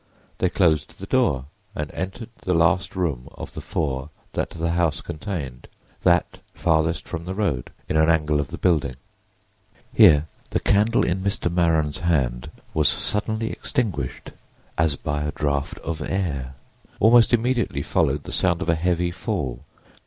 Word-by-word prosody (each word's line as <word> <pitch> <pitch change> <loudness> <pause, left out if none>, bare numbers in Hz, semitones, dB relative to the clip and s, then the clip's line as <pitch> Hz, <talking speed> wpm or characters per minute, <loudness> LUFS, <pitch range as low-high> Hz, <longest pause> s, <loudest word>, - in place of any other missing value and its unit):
They 90 - +2
closed 80 -7 +1
the - - -7
door 65 -1 +2 0.3
and 75 -1 -3
entered 100 +5 -5
the 90 - 0
last 85 +4 +2
room 80 -10 -2
of - - -8
the - - -6
four 70 -3 -2 0.2
that - - -1
the 85 0 -2
house 85 -3 +1
contained—that 85 - -2 0.2
farthest 80 -2 +1
from 85 -1 -5
the 95 +1 -4
road, 75 - -1 0.2
in - - 0
an 80 +1 +4
angle 75 -2 +2
of 70 - -1
the - - -7
building. 75 -7 +1 1.0
Here 75 0 +7 0.2
the - - 0
candle 110 +4 +3
in 90 +2 0
Mr. 95 -3 -1
Maren's 80 -2 +2
hand 65 -9 0 0.2
was 75 -2 +3
suddenly 110 +2 -1
extinguished 85 - -3 0.4
as 80 -3 +2
by 75 0 -3
a 75 0 -1
draught 70 -1 -1
of 80 -1 -3
air. 70 -8 -2 0.4
Almost 115 +2 +6
immediately 120 - +1
followed 70 +1 +1
the - - -8
sound 90 -2 +2
of - - -4
a - - +5
heavy 85 +1 +1
fall. 70 -7 -3
80 Hz, 155 wpm, -24 LUFS, 75-95 Hz, 1.0 s, Here